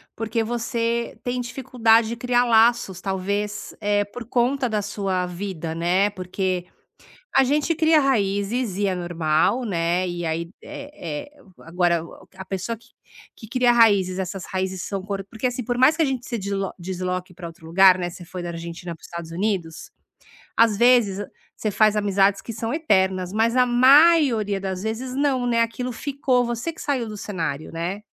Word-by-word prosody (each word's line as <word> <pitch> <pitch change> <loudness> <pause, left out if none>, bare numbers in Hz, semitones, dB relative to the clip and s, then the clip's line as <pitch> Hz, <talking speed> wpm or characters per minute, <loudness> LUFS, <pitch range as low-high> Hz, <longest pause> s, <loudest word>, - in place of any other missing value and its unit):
porque 225 0 -1
você 235 0 -2
tem 250 0 -2
dificuldade 235 -3 +2
de 235 - -3
criar 245 +1 +1
laços, 225 -5 +3
talvez, 200 +2 -3
eh, 205 0 +1
por 230 +4 -9
conta 250 +3 +1
da 215 -1 0
sua 195 -3 -2
vida, 175 -3 -5
né. 180 +4 +2
Porque 185 -1 -3 0.7
a 270 - +6
gente 295 +5 +1
cria 315 -1 +4
raízes, 205 -3 0
e 205 0 +1
é 185 - 0
normal, 175 +6 +1
né. 175 -2 0
E 175 -1 -4
aí, 165 +1 -2
é 175 - -7
é - - -19 0.2
agora, 170 0 0
o 170 - -14
a 190 - -8
pessoa 195 +5 -4
que 235 +2 -23 0.5
que 220 - -12
cria 245 +1 +3
raízes, 200 -6 +4
essas 190 0 -4
raízes 190 0 -3
são 195 -2 -4
cor 195 -1 -4
porque 230 +2 -2
assim, 250 0 -4
por 245 +2 -2
mais 260 +5 +5
que 330 - +3
a - - +3
gente 260 -3 -3
se 235 - -3
deslo 195 -1 -3
desloque 185 0 -4
pra 175 0 -8
outro 165 -1 -13
lugar, 185 +3 +6
né, 175 - -2
você 175 +1 -11
foi 180 0 -7
da 175 - -4
Argentina 170 +1 -6
para - - -26
os - - -12
Estados 170 -1 -7
Unidos, 175 -3 -3 0.7
às 225 -3 +4
vezes 225 -4 +4 0.3
você 215 - -2
faz 215 +1 +3
amizades 200 -1 +2
que 230 - -7
são 225 +1 -3
eternas, 190 - +1
mas 225 +2 +2
a 250 0 +5
maioria 255 -4 +5
das 190 -1 -4
vezes 230 +4 -4
não, 270 -3 +1
né. 235 -1 +2
Aquilo 240 +2 -2
ficou, 260 -1 0
você 240 +7 -3
que - - -15
saiu 265 -5 -1
do 210 - -7
cenário, 165 -8 -4
né. 175 +5 -4
205 Hz, 180 wpm, -23 LUFS, 185-240 Hz, 0.7 s, a